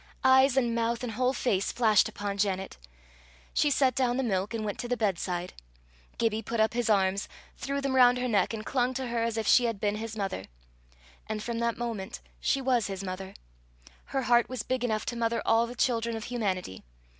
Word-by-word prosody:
Eyes 265 Hz, 0 st, +5 dB
and 240 Hz, -3 st, +2 dB
mouth 235 Hz, +1 st, -1 dB
and 245 Hz, -, -3 dB
whole 250 Hz, +3 st, +1 dB
face 205 Hz, -7 st, 0 dB
flashed 220 Hz, -4 st, +3 dB
upon 205 Hz, -1 st, -4 dB
Janet! 190 Hz, -1 st, -1 dB, 0.8 s
She 295 Hz, -, +3 dB
set 265 Hz, -2 st, +3 dB
down 250 Hz, 0 st, +1 dB
the 265 Hz, -, 0 dB
milk, 195 Hz, -3 st, -1 dB
and 225 Hz, -2 st, -3 dB
went 205 Hz, -, -4 dB
to 240 Hz, -, -3 dB
the 245 Hz, 0 st, -1 dB
bedside. 180 Hz, -4 st, -2 dB, 0.6 s
Gibbie 225 Hz, -1 st, 0 dB
put 230 Hz, +1 st, -4 dB
up 220 Hz, +1 st, +3 dB
his 240 Hz, -1 st, 0 dB
arms, 195 Hz, -1 st, +2 dB, 0.3 s
threw 280 Hz, 0 st, -3 dB
them 275 Hz, -1 st, -1 dB
round 250 Hz, -1 st, +6 dB
her 250 Hz, 0 st, -1 dB
neck, 205 Hz, -6 st, +2 dB
and 220 Hz, -1 st, -5 dB
clung 255 Hz, -1 st, 0 dB
to 260 Hz, -1 st, -3 dB
her 235 Hz, -1 st, -1 dB
as 230 Hz, -1 st, -1 dB
if 220 Hz, -, -1 dB
she 245 Hz, +4 st, +5 dB
had 230 Hz, -4 st, -2 dB
been 205 Hz, 0 st, 0 dB
his 220 Hz, 0 st, -6 dB
mother. 195 Hz, -, -3 dB, 0.8 s
And 215 Hz, -1 st, -3 dB
from 235 Hz, -1 st, -3 dB
that 235 Hz, -1 st, 0 dB
moment 230 Hz, -5 st, -4 dB, 0.2 s
she 275 Hz, -, +1 dB
was 250 Hz, -4 st, +1 dB
his 195 Hz, -1 st, -5 dB
mother: 190 Hz, +1 st, -6 dB, 0.7 s
her 270 Hz, -1 st, -2 dB
heart 240 Hz, -1 st, +3 dB
was 255 Hz, -4 st, -4 dB
big 255 Hz, -1 st, -2 dB
enough 220 Hz, -3 st, -1 dB
to 240 Hz, -, -3 dB
mother 230 Hz, 0 st, 0 dB
all 230 Hz, +1 st, +3 dB
the 245 Hz, -, -8 dB
children 230 Hz, -2 st, 0 dB
of 220 Hz, -, -6 dB
humanity. 195 Hz, -, -3 dB
230 Hz, 210 wpm, -28 LUFS, 210-245 Hz, 0.8 s, round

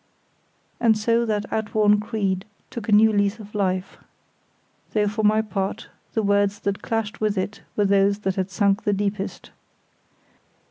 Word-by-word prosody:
And 225 Hz, -2 st, +4 dB
so 230 Hz, +2 st, +1 dB
that 210 Hz, -1 st, 0 dB
outworn 210 Hz, -1 st, +2 dB
creed 200 Hz, -3 st, -2 dB, 0.3 s
took 230 Hz, -2 st, -6 dB
a -, -, +1 dB
new 215 Hz, +1 st, +6 dB
lease 205 Hz, +1 st, +1 dB
of 210 Hz, -2 st, -12 dB
life; 185 Hz, -2 st, -1 dB, 1.0 s
though 210 Hz, -1 st, +2 dB
for 210 Hz, +2 st, -2 dB
my 215 Hz, +1 st, +3 dB
part 200 Hz, 0 st, -3 dB, 0.3 s
the 220 Hz, -, +1 dB
words 200 Hz, 0 st, +2 dB
that 200 Hz, -1 st, -2 dB
clashed 225 Hz, -2 st, -3 dB
with 210 Hz, -2 st, 0 dB
it 190 Hz, +3 st, -3 dB
were 205 Hz, -, +2 dB
those 200 Hz, 0 st, +3 dB
that 190 Hz, -2 st, 0 dB
had 190 Hz, 0 st, -2 dB
sunk 200 Hz, +1 st, +1 dB
the 205 Hz, -, +1 dB
deepest. 200 Hz, 0 st, -3 dB
205 Hz, 155 wpm, -23 LUFS, 200-215 Hz, 1.0 s, new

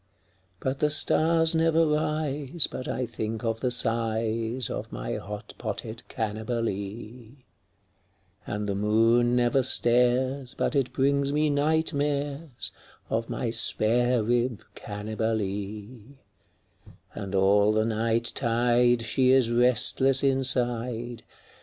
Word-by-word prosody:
But 135 Hz, +1 st, -3 dB
the 150 Hz, -, +2 dB
stars 160 Hz, +2 st, +4 dB
never 165 Hz, 0 st, +2 dB
rise 150 Hz, -1 st, 0 dB
but 130 Hz, -, -7 dB
I 130 Hz, -, -2 dB
think 110 Hz, 0 st, -5 dB
of 115 Hz, -1 st, -2 dB
the 125 Hz, -, -1 dB
size 115 Hz, 0 st, 0 dB
Of -, -, -6 dB
my -, -, -4 dB
hot 105 Hz, +1 st, -8 dB
potted 110 Hz, +1 st, -6 dB
Cannibalee, 110 Hz, +1 st, -5 dB, 1.1 s
And 105 Hz, 0 st, -3 dB
the 100 Hz, -, -1 dB
moon 115 Hz, +4 st, +2 dB
never 125 Hz, +2 st, +2 dB
stares 125 Hz, +1 st, +1 dB
but -, -, -1 dB
it 130 Hz, -3 st, 0 dB
brings 140 Hz, +1 st, +1 dB
me 150 Hz, +1 st, +1 dB
night 160 Hz, +3 st, +1 dB
mares 145 Hz, -2 st, -3 dB, 0.4 s
Of 115 Hz, +1 st, -2 dB
my 120 Hz, -, -3 dB
spare 120 Hz, +1 st, +2 dB
rib 120 Hz, 0 st, -1 dB
Cannibalee; 105 Hz, +3 st, -5 dB, 1.0 s
And 100 Hz, -1 st, -6 dB
all 100 Hz, +2 st, +3 dB
the 110 Hz, 0 st, +1 dB
night 115 Hz, +1 st, 0 dB
tide 120 Hz, 0 st, +2 dB
she 130 Hz, +3 st, +1 dB
is 130 Hz, -3 st, +3 dB
restless 125 Hz, +2 st, +4 dB
inside. 120 Hz, -3 st, 0 dB
120 Hz, 115 wpm, -26 LUFS, 110-135 Hz, 1.1 s, stars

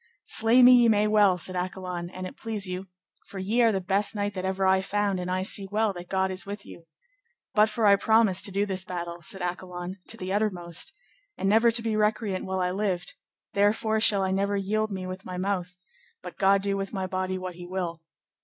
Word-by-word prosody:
Slay 230 Hz, +3 st, +4 dB
me 250 Hz, -, +9 dB
ye 240 Hz, -1 st, +5 dB
may 210 Hz, -1 st, +3 dB
well, 210 Hz, -3 st, +4 dB
said 185 Hz, +2 st, 0 dB
Accolon, 180 Hz, -1 st, -4 dB
an 185 Hz, 0 st, -7 dB
it 185 Hz, -, -8 dB
please 220 Hz, -3 st, -2 dB
you, 185 Hz, +1 st, -5 dB, 0.4 s
for 200 Hz, -, -10 dB
ye 205 Hz, +6 st, 0 dB
are 230 Hz, -1 st, +5 dB
the 195 Hz, -, 0 dB
best 195 Hz, +3 st, 0 dB
knight 205 Hz, 0 st, -2 dB
that 185 Hz, -1 st, -5 dB
ever 190 Hz, 0 st, 0 dB
I 190 Hz, 0 st, +4 dB
found, 200 Hz, -1 st, -1 dB
and 180 Hz, 0 st, -4 dB
I 185 Hz, +1 st, -1 dB
see 195 Hz, 0 st, 0 dB
well 215 Hz, 0 st, +1 dB
that 175 Hz, -1 st, -9 dB
God 190 Hz, 0 st, 0 dB
is 185 Hz, 0 st, -3 dB
with 200 Hz, +1 st, -7 dB
you. 165 Hz, -1 st, -13 dB, 0.7 s
But 215 Hz, +1 st, +4 dB
for 225 Hz, 0 st, -1 dB
I 200 Hz, -1 st, +7 dB
promised 220 Hz, -3 st, +3 dB
to 200 Hz, -, -2 dB
do 200 Hz, +2 st, 0 dB
this 190 Hz, -2 st, -1 dB
battle, 175 Hz, -2 st, -6 dB
said 190 Hz, +3 st, -3 dB
Accolon, 180 Hz, +1 st, -5 dB
to 225 Hz, -, -3 dB
the 185 Hz, -2 st, -4 dB
uttermost, 185 Hz, -, -1 dB, 0.5 s
and -, -, -1 dB
never 225 Hz, +4 st, +5 dB
to 230 Hz, 0 st, +2 dB
be 225 Hz, -1 st, -1 dB
recreant 210 Hz, -2 st, 0 dB
while 190 Hz, 0 st, -2 dB
I 180 Hz, 0 st, 0 dB
lived, 190 Hz, -2 st, -2 dB, 0.4 s
therefore 220 Hz, +2 st, +2 dB
shall 205 Hz, -3 st, +3 dB
I 190 Hz, -, 0 dB
never 200 Hz, +1 st, 0 dB
yield 215 Hz, +2 st, -1 dB
me 190 Hz, -1 st, -4 dB
with 185 Hz, +1 st, -7 dB
my 180 Hz, 0 st, -6 dB
mouth, 185 Hz, -1 st, -2 dB, 0.5 s
but 180 Hz, -, -8 dB
God 195 Hz, 0 st, +4 dB
do 200 Hz, 0 st, 0 dB
with 195 Hz, 0 st, -4 dB
my 190 Hz, -3 st, -3 dB
body 185 Hz, 0 st, -2 dB
what 185 Hz, -1 st, -6 dB
he 175 Hz, 0 st, -10 dB
will. 175 Hz, -3 st, -4 dB
190 Hz, 225 wpm, -26 LUFS, 185-210 Hz, 0.7 s, me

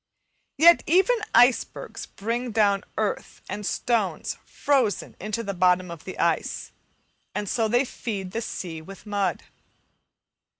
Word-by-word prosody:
Yet 340 Hz, +4 st, +7 dB
even 380 Hz, +9 st, +4 dB, 0.2 s
icebergs 245 Hz, 0 st, +2 dB
bring 235 Hz, +4 st, -3 dB
down 205 Hz, -3 st, +2 dB
earth 215 Hz, -2 st, -2 dB
and 210 Hz, -, -5 dB
stones 220 Hz, -1 st, 0 dB
frozen 255 Hz, -, 0 dB
into 215 Hz, +4 st, -3 dB
the 200 Hz, -2 st, -3 dB
bottom 180 Hz, -1 st, +2 dB
of 170 Hz, -2 st, -9 dB
the 185 Hz, -, -7 dB
ice, -, -, 0 dB, 0.6 s
and 205 Hz, -, -2 dB
so 225 Hz, +3 st, +1 dB
they 240 Hz, +5 st, +3 dB
feed 200 Hz, -7 st, -5 dB
the 230 Hz, -, -2 dB
sea 170 Hz, -7 st, -5 dB
with 195 Hz, +6 st, -12 dB
mud. 200 Hz, -4 st, -1 dB
210 Hz, 130 wpm, -25 LUFS, 190-240 Hz, 0.6 s, Yet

